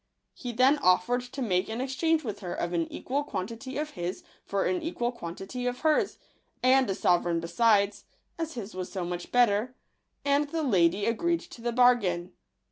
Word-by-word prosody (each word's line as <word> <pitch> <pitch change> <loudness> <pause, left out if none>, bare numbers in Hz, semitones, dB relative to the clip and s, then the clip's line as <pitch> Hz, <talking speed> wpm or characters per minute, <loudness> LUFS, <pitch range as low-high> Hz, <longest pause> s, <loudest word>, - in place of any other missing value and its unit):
He 245 - -6
then 260 +5 +4
offered 240 +2 +3
to 250 +2 -6
make 185 -3 +1
an 225 +2 -3
exchange 310 +5 +1
with 210 -5 -5
her 180 -4 -5
of 175 0 -3
an 165 -1 -1
equal 280 +3 -2
quantity 230 +3 -5
of 300 +1 -3
his 175 +1 -5 0.2
for 195 -1 -1
an 360 -2 0
equal 245 -7 -2
quantity 200 +4 -6
of 245 0 -3
hers, 310 -1 +2 0.5
and 260 -2 +5
a 195 - 0
sovereign 175 -2 +2
besides, 200 +4 +2 0.3
as 325 -1 -3
his 220 -3 -6
was 185 0 -5
so 185 -2 -3
much 175 0 -5
better; 245 0 +3 0.5
and 285 +1 +2
the 325 0 -2
lady 190 - +3
agreed 340 +9 +1
to 235 - -12
the 240 0 -1
bargain. 230 -8 +3
235 Hz, 180 wpm, -28 LUFS, 185-265 Hz, 0.5 s, and